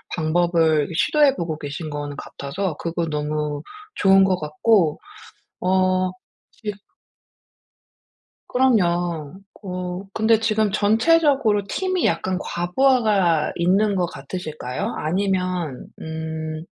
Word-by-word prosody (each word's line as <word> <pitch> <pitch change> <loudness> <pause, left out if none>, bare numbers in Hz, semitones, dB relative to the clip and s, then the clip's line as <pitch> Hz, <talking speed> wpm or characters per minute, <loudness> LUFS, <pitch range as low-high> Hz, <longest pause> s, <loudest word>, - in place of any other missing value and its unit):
방법을 160 -2 +2
시도해 290 - +3
보고 165 -6 -3
계신 150 +1 -6
거는 145 -1 -5
같아서 165 +4 -4
그거 170 0 -2
너무 150 -1 -2 0.3
좋은 195 0 +5
것 185 -1 +2
같고 155 +2 +2 0.6
어. 185 0 +2 0.4
지금 210 -2 -6 1.7
그럼요. 175 - +1 0.2
어. 180 -1 -4
근데 220 0 +3
지금 215 -2 +1
전체적으로 225 0 +3
팀이 370 - -1
약간 185 0 0
과부하가 190 - +2
있는 195 +4 +2
것 180 -1 +1
같으실까요? 155 - -5
아니면 180 -4 -1
음. 160 0 -5
180 Hz, 215 characters per minute, -22 LUFS, 155-205 Hz, 1.7 s, 좋은